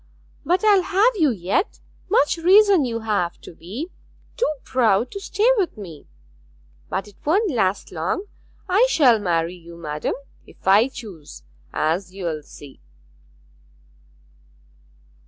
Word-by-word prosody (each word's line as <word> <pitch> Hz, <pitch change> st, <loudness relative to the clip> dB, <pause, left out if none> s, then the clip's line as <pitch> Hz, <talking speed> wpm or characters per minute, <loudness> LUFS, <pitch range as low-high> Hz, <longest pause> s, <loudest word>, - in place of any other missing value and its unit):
'But 365 Hz, +4 st, +1 dB
I'll 405 Hz, -3 st, +6 dB
have 395 Hz, +6 st, +2 dB
you 315 Hz, -5 st, +4 dB
yet. 200 Hz, -, -1 dB, 0.3 s
Much 330 Hz, -8 st, +3 dB
reason 380 Hz, -1 st, +5 dB
you 230 Hz, -2 st, -3 dB
have 205 Hz, -6 st, -1 dB
to -, -, -11 dB
be 225 Hz, -, -7 dB, 0.4 s
too -, -, +1 dB
proud 235 Hz, -2 st, +1 dB
to 400 Hz, -, -6 dB
stay 410 Hz, +3 st, 0 dB
with 370 Hz, -, -1 dB
me. 170 Hz, -8 st, -10 dB, 0.8 s
But 195 Hz, -, -3 dB
it 205 Hz, -, -17 dB
won't 380 Hz, +6 st, +2 dB
last 200 Hz, -6 st, 0 dB
long; 175 Hz, -, -2 dB, 0.4 s
I 405 Hz, +7 st, +4 dB
shall 255 Hz, -, +4 dB
marry 170 Hz, -3 st, 0 dB
you, 170 Hz, -1 st, -13 dB
madam, 150 Hz, -2 st, -3 dB, 0.3 s
if -, -, -17 dB
I 205 Hz, +5 st, +6 dB
choose, 190 Hz, -, -11 dB, 0.3 s
as 180 Hz, +4 st, -1 dB
you'll 170 Hz, -5 st, -3 dB
see.' 145 Hz, -1 st, -14 dB
225 Hz, 130 wpm, -22 LUFS, -, 0.8 s, I'll